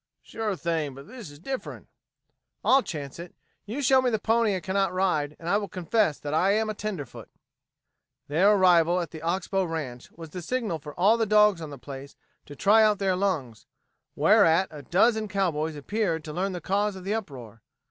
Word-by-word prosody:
"Sure 220 -3 -3
thing, 160 -6 -2
but 140 +1 -12
this 240 - -10
is 145 - -13
different." 265 - -6 0.8
"I'll 270 +1 +5
chance 145 - -7
it. 175 0 -9 0.3
You 260 +7 -4
show 265 0 +5
me 255 - +1
the 220 - 0
pony 225 -1 +1
I - - -2
cannot 195 +2 0
ride, 155 -6 0
and 165 - -10
I 200 +4 +3
will 205 -1 -3
confess 185 -2 0
that 145 0 -5
I 185 +5 +3
am 215 0 0
a - - -4
tenderfoot." 205 -9 -6 1.0
Their 180 +8 +4
arrival 180 -3 +4
at 170 - -4
the 160 - -9
Ox 175 +3 -2
Bow 195 -1 0
ranch 150 -8 -5
was 165 -2 -11
the 180 - -6
signal 215 -4 -2
for 145 0 -10
all 210 +6 +5
the 225 -1 0
dogs 210 -3 +4
on 155 - -6
the 140 - -9
place 140 +1 -10 0.3
to 145 - -10
try 205 +9 +4
out 215 -1 +4
their 190 -2 0
lungs, 155 - -2 0.5
whereat 165 +4 +4
a 150 -2 -9
dozen 215 - +2
cowboys 165 -6 -1
appeared 165 +1 -2
to 150 - -7
learn 190 +4 -2
the 180 - -5
cause 205 +1 0
of 190 - -9
the 200 +3 -2
uproar. 125 - -7
185 Hz, 200 wpm, -26 LUFS, 155-210 Hz, 1.0 s, I'll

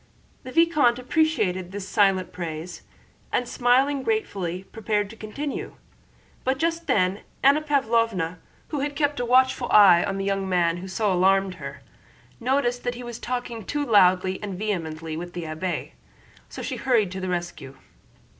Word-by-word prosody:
The 255 - -9
vicomte 305 -7 +3
appreciated 250 - 0
this 200 -1 -6
silent 195 -3 +2
praise 170 0 -6 0.5
and 245 - 0
smiling 265 +4 +2
gratefully 195 - -2
prepared 210 -2 -1
to - - -11
continue, 265 +7 -5 0.7
but 265 +1 0
just 330 +2 -1
then 185 0 +1 0.2
Anna 280 +3 +5
Pávlovna, 230 - 0 0.3
who 295 - -2
had 285 +1 -2
kept 290 -2 0
a 245 - -1
watchful 255 0 +3
eye 190 -5 +7
on 195 - -2
the 195 - -2
young 195 -1 -1
man 175 -2 +2
who 185 +2 -7
so 200 +1 0
alarmed 190 +1 +3
her, 140 +1 -8 0.6
noticed 245 0 0
that 245 0 -2
he 245 - -8
was 240 -1 -7
talking 240 -2 -4
too 290 +8 -2
loudly 185 -4 +4
and 200 -3 -5
vehemently 165 -6 -3
with 175 +2 -6
the 175 - -5
abbé, 160 +3 -4 0.6
so - - -7
she - - -4
hurried 230 -8 +2
to 190 - -5
the 185 - -3
rescue. 175 -6 -4
210 Hz, 160 wpm, -25 LUFS, 180-255 Hz, 0.7 s, eye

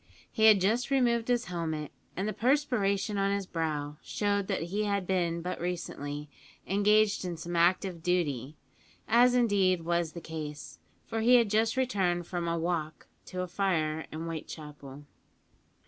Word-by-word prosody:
He 220 -2 +2
had 215 -2 +8
just 225 +7 +1
removed 240 -4 +2
his 245 0 +1
helmet, 160 -4 -3 0.3
and 195 +3 -1
the 215 - -2
perspiration 215 -4 +1
on 195 0 +2
his 200 -1 -1
brow 150 -4 -3
showed 200 -1 -1
that 195 -5 -1
he 210 +1 +1
had 200 -2 0
been 170 -2 0
but 180 -1 -4
recently 150 -4 -4 0.4
engaged 210 +1 +3
in 175 -2 -4
some 170 +2 -5
active 175 +1 +2
duty; 155 -6 -1 0.5
as 245 +2 +5
indeed 195 -7 +3
was 170 -1 0
the 170 - -6
case, 150 -3 -7 0.3
for 225 - -3
he 245 +3 +6
had 230 -4 +4
just 220 +3 +2
returned 190 -9 +1
from 175 -1 -3
a 170 0 0
"walk" 165 -2 -3 0.2
to 185 - -4
a 180 - -3
fire 160 -4 -1
in 155 +1 -5
Whitechapel. 150 -3 -8
180 Hz, 160 wpm, -30 LUFS, 160-210 Hz, 0.5 s, had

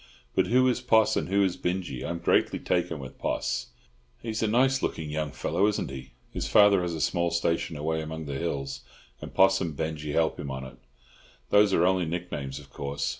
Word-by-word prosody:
But - - +2
who 130 +2 +4
is 125 -1 +1
Poss? 110 -3 +4
and - - -1
who 100 +1 +3
is 95 -2 0
Binjie? 90 -8 -3
I'm 85 - -3
greatly 85 - +2
taken 90 -2 -1
with 65 -3 -10
Poss." - - -2 0.5
"He's 110 -1 -4
a 110 - +2
nice 130 +4 +3
looking 75 -2 -3
young 75 -1 -2
fellow, 100 - 0
isn't 105 -9 -1
he? 65 -1 -9 0.2
His - - -3
father 100 -2 +6
has 85 -2 -2
a - - -5
small 85 +5 +1
station 85 -1 -1
away 80 +2 -1
among 80 0 -6
the 70 - -5
hills, 70 -5 -3 0.4
and - - -7
Poss 95 0 +4
and 80 -6 -3
Binjie 75 -1 -3
help 80 0 +1
him 70 - -5
on 65 0 -5
it. 65 - -11 0.7
Those 105 0 +5
are 85 -2 +3
only 95 -1 +2
nick 90 +2 -4
names, 70 -2 -4
of 70 -2 -12
course. 70 0 -3
85 Hz, 210 wpm, -27 LUFS, 75-100 Hz, 0.7 s, father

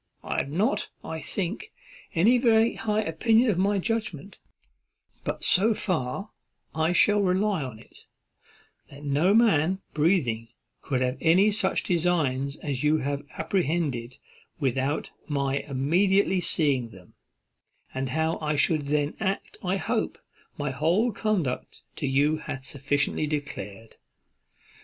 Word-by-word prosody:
I - - -3
have - - -3
not, 200 - 0
I 160 0 -5
think, 195 +2 -4 0.4
any 225 +9 +4
very 230 -1 +4
high 215 0 -1
opinion 225 +8 +3
of 180 - -1
my 200 +2 +2
judgment, 200 -4 -3 0.8
but - - -4
so 215 +4 +5
far 185 +3 -2 0.4
I 160 +1 +1
shall 205 +3 +4
rely 195 0 +1
upon 130 -5 -6
it, 110 - -18 0.9
that 140 +1 -13
no 150 +8 +2
man 190 -6 +3
breathing 145 - +1 0.3
could 130 -2 -1
have 125 +1 -1
any 185 +6 +5
such 200 -2 +1
designs 150 -6 0
as 140 -4 -4
you 150 +1 +3
have 140 -1 -2 0.2
apprehended 155 -8 -1 0.4
without 135 +1 -1 0.2
my 140 -2 0
immediately 180 +8 +2
seeing 140 -9 +1
them; 95 -4 -16 0.8
and 130 0 -3
how 160 +4 0
I 150 -1 0
should 150 0 +1
then 145 0 0
act 195 -2 -3
I 185 +1 0
hope 175 - -2 0.4
my 145 -1 -2
whole 170 - +1
conduct 195 - -2
to 145 - -2
you 145 +4 +2
hath 135 -3 -7
sufficiently 145 +2 -1
declared." 115 -8 -5
160 Hz, 130 wpm, -26 LUFS, 140-195 Hz, 0.9 s, so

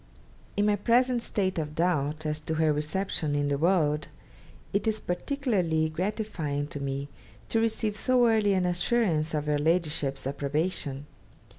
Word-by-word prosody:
In 205 - +3
my 210 -1 +3
present 245 +3 +3
state 190 -6 -1
of 150 -1 -4
doubt 155 -3 0
as 150 0 -1
to 160 +1 -3
her 155 -1 +3
reception 150 0 -1
in 145 0 +1
the 140 - +1
world, 155 -3 +2 0.7
it 200 +3 0
is 215 0 +1
particularly 180 - 0
gratifying 170 -5 -2
to 145 - -6
me 140 0 -3 0.4
to 225 - +2
receive 220 -1 0
so 250 +2 +3
early 215 -3 +3
an 185 -1 +1
assurance 175 -3 +1
of 150 -1 -1
your 150 -1 +1
Ladyship's 150 -4 0
approbation. 140 0 -2
165 Hz, 150 wpm, -28 LUFS, 150-205 Hz, 0.7 s, In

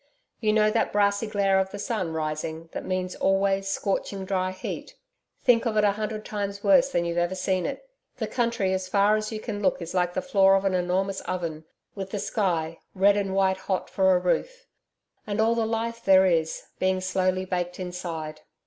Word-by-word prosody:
You 215 -2 +2
know 215 0 +3
that 225 - +1
brassy 200 +1 +2
glare 195 -2 +2
of 190 0 0
the 205 - -7
sun 200 -4 -2
rising 160 +1 -4
that - - -5
means 185 0 -2
always 195 0 +1
scorching 195 0 -2
dry 185 -1 0
heat? 185 - -6 0.5
Think 245 -1 +4
of 215 -2 -1
it 210 - +4
a 205 - +5
hundred 215 +1 -4
times 200 -1 -4
worse 275 -2 +5
than 170 -10 0
you've 170 0 -1
ever 175 +2 0
seen 185 -1 0
it! 280 - -6 0.3
The - - -2
country 230 -6 0
as 185 0 -2
far 200 +2 +3
as 215 +1 -2
you 215 - -4
can 210 -2 -5
look 190 -2 +1
is 170 -1 -6
like 180 -1 0
the - - 0
floor 195 -8 +5
of 195 0 0
an 195 - +2
enormous 185 +2 0
oven, 165 -4 -3 0.3
with 195 -2 -6
the 205 - -3
sky, 170 -6 -1 0.2
red 200 +2 +5
and 195 -2 -1
white 190 -1 +2
hot 190 0 -3
for 190 -1 +4
a - - +3
roof, - - -1 0.6
and 205 0 -2
all 225 +1 +4
the 230 -1 0
life 230 +1 -3
there 190 -1 +6
is, 165 -3 +1 0.2
being 185 0 +1
slowly 185 0 0
baked 180 -1 -3
inside. 170 -4 -5
195 Hz, 200 wpm, -26 LUFS, 185-210 Hz, 0.6 s, there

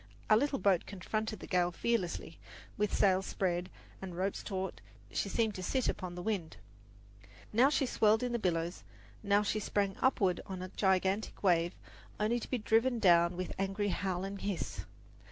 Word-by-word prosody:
Our 215 - +8
little 280 +3 +1
boat 195 -7 +2
confronted 215 +2 -3
the - - -6
gale 180 -1 +1
fearlessly; 180 -5 -2 0.4
with 210 0 0
sails 190 -1 +3
spread 180 -1 -1 0.3
and 185 -3 -6
ropes 190 +2 -1
taut, 190 -2 -4 0.3
she 200 - -1
seemed 220 +1 +1
to 185 - -6
sit 255 +7 0
upon 180 -2 -3
the 175 - -6
wind. 180 - -2 1.0
Now 250 +5 +6
she 290 -2 +1
swirled 220 -2 +3
in 245 - -1
the 240 - 0
billows, 170 -3 -1 0.4
now 205 0 +3
she 215 +1 0
sprang 200 -1 0
upward 200 -9 +2
on 185 -1 -5
a 185 - -6
gigantic 190 +2 0
wave, 175 -2 +3 0.4
only 220 +3 +1
to - - -8
be 255 - 0
driven 230 +3 +2
down 175 -4 +4
with 185 - -3
angry 195 +1 0
howl 185 -1 -1
and 195 0 -5
hiss. 200 -3 -3
195 Hz, 170 wpm, -33 LUFS, 180-215 Hz, 1.0 s, Our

